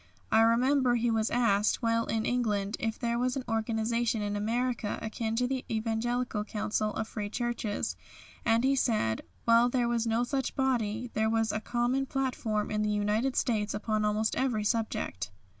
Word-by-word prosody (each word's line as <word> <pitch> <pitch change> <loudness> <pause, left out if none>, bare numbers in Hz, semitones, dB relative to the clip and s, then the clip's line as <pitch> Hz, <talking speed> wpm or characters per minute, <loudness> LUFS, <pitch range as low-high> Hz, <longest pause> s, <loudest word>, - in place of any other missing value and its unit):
I 220 - +6
remember 245 +3 +4
he 235 0 +1
was 220 -1 +1
asked, 220 -1 +2
while 230 0 +1
in 220 -1 -1
England, 210 -4 0
if 225 -1 -2
there 235 -1 -1
was 250 0 0
an 270 - -3
organisation 225 +1 0
in 205 0 -2
America 230 +1 -1
akin 220 0 -3
to 250 +2 +1
the 260 0 -2
Evangelical 225 0 -1
Council 215 0 -1
of 220 - -2
Free 210 -2 -4
Churches, 235 -2 -2 0.5
and 225 +1 +3
he 270 +1 +3
said, 215 - +1 0.2
while 235 +1 +5
there 245 -1 +1
was 235 -1 0
no 225 +2 +2
such 265 +1 -2
body, 240 -3 0
"there 220 0 +1
was 225 0 +1
a 215 - -1
common 245 +4 0
platform 245 -6 -1
in 210 0 0
the 210 - +1
United 210 +5 +1
States 215 -4 0
upon 215 0 -1
almost 210 +1 +1
every 245 -5 0
subject." 210 - -1
225 Hz, 175 wpm, -30 LUFS, 215-245 Hz, 0.5 s, I